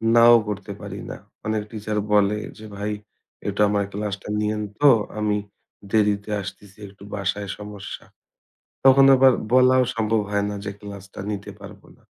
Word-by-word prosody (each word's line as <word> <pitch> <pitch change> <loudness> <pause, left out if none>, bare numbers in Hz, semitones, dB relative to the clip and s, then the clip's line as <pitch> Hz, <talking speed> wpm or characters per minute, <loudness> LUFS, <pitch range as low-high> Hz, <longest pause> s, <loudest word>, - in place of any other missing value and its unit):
নাও 120 0 +8
করতে 105 -3 -5
পারি - - -7
না। - - -7 0.3
অনেক 110 0 -1
টিচার 110 -1 -4 0.2
বলে 105 0 +4 0.2
যে, 110 - -11
"ভাই 105 +1 -2 0.6
এটা 100 +1 -1
আমার 100 -1 +1
ক্লাসটা 100 -1 -4
নিয়েন 105 0 -1 0.2
তো, 145 - +7 0.3
আমি 105 -1 +1 0.5
দেরিতে 105 -1 +2
আসতেছি, 95 +1 -10
একটু 100 0 -16
বাসায় 100 0 -2
সমস্যা।" 105 -1 -8 0.8
তখন 135 +1 +8
আবার 130 0 +6 0.2
বলাও 130 0 +6
সম্ভব 110 -1 +1
হয় 100 0 +1
না - - -4
যে 105 - -3
ক্লাস-টা 100 -1 -9
নিতে 100 -1 -5
পারব - - -11 0.2
না। - - -28
105 Hz, 155 wpm, -23 LUFS, 100-110 Hz, 0.8 s, নাও